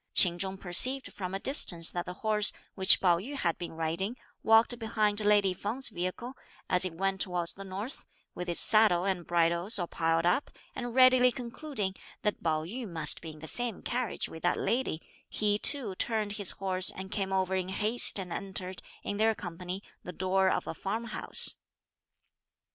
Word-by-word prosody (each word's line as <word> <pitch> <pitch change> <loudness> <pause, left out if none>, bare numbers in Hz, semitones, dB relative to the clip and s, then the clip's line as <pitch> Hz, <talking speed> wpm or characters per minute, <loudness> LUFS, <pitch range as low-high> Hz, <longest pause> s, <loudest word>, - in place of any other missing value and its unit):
Ch'in 175 -2 +5
Chung 190 +1 -4
perceived 250 +9 +2
from 185 -1 -6
a - - -4
distance 175 - +6
that 175 0 -5
the 180 - -6
horse, 210 -1 +4 0.2
which 190 -1 +6
Pao 175 -3 +2
yü 265 +10 -8
had 170 -11 -2
been 175 - -7
riding, 165 +8 -3 0.2
walked 225 +2 +3
behind 215 -2 -1
lady 205 -2 +2
Feng's 225 +8 -2
vehicle, 185 +8 -5 0.3
as 180 0 +2
it 180 -3 -4
went 195 +1 -2
towards 175 -2 +2
the 195 - -11
north, 195 +8 -6 0.3
with 180 0 -7
its 170 - +1
saddle 215 -5 +5
and 185 -3 -3
bridles 170 +4 +2
all 175 - -1
piled 165 0 -1
up, 180 +11 0 0.3
and 245 -2 -6
readily 255 -1 +5
concluding 240 -4 -5 0.3
that 210 - -2
Pao 155 -2 -1
yü 225 +6 -7
must 160 -3 0
be 165 - -9
in 155 -1 -13
the 160 - -9
same 240 +2 -4
carriage 245 -3 -3
with 160 - -11
that 175 - 0
lady, 230 -6 -2 0.3
he 210 -1 -1
too 255 -8 +3
turned 215 +1 -2
his 200 -3 0
horse 185 -1 +1
and 190 +1 -5
came 195 -3 -3
over 190 -1 -1
in 185 -1 -2
haste 215 +5 +4
and 185 -3 -5
entered, 190 -1 -7 0.2
in 205 - -4
their 220 +1 +1
company, 180 +1 -7 0.2
the 180 - -9
door 190 +2 0
of - - -2
a - - -5
farm 205 +7 -5
house. - - +1
190 Hz, 185 wpm, -28 LUFS, 175-220 Hz, 0.3 s, distance